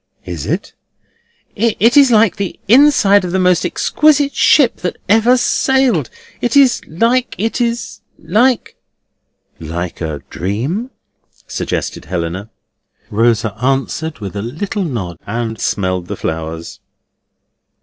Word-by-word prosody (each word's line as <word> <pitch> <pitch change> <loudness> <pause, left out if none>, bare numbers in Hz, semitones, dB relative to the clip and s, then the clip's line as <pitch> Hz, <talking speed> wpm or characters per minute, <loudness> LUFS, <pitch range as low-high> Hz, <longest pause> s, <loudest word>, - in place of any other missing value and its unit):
"Is 85 -5 -6
it?" - - -3 0.8
"It 230 +3 +2
is 280 -2 +7
like 220 -3 +3
the 200 -2 -4
inside 220 -5 +5
of 180 - -3
the 190 - 0
most 180 -2 +2
exquisite 285 - +2
ship 275 -6 +4
that 180 - -4
ever 225 +5 +4
sailed. 250 - +1 0.3
It 240 +3 +1
is 270 -3 +4
like—it 230 +4 0
is 235 0 -2 0.2
like—" 245 +3 +1 0.8
"Like 85 +2 -5
a 80 -3 -4
dream?" 130 - -3 0.6
suggested - - -4
Helena. 90 +3 -4 0.6
Rosa 115 -1 +1
answered 135 +4 -1
with 100 -2 -7
a 100 - -3
little 165 - -3
nod, 95 - -4
and 115 +1 -3
smelled 95 -2 -1
the - - -5
flowers. 80 +1 -5
175 Hz, 120 wpm, -16 LUFS, -, 0.8 s, is